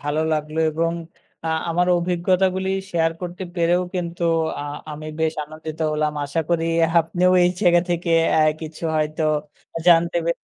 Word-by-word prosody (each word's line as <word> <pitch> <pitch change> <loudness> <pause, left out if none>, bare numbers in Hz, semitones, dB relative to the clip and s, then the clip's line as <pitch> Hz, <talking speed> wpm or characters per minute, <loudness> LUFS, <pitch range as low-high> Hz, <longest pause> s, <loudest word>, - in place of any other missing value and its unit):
ভালো 145 +2 -1
লাগলো 155 +1 -2
এবং 165 +2 0 0.5
আ - - 0 0.2
আমার 175 +2 +1
অভিজ্ঞতাগুলি 185 +2 +1 0.2
share 165 -1 +1
করতে 180 +1 -5
পেরেও 175 +1 +2
কিন্তু 170 -1 -4 0.4
আ - - -4 0.3
আমি 155 +1 -8
বেশ 160 0 +1
আনন্দিত 155 +1 -9
হলাম। 150 0 0
আশা 145 +4 -1
করি 170 -1 +1 0.4
আপনিও 180 +3 +1
এই 175 - +4
জায়গা 175 -3 +5
থেকে 170 0 -1 0.2
অ্যা 155 - +4 0.2
কিছু 160 +1 -8
হয়তো 155 +1 -1 0.6
জানতে 170 0 +5
পে 170 - +3
170 Hz, 150 wpm, -22 LUFS, 155-175 Hz, 0.6 s, জায়গা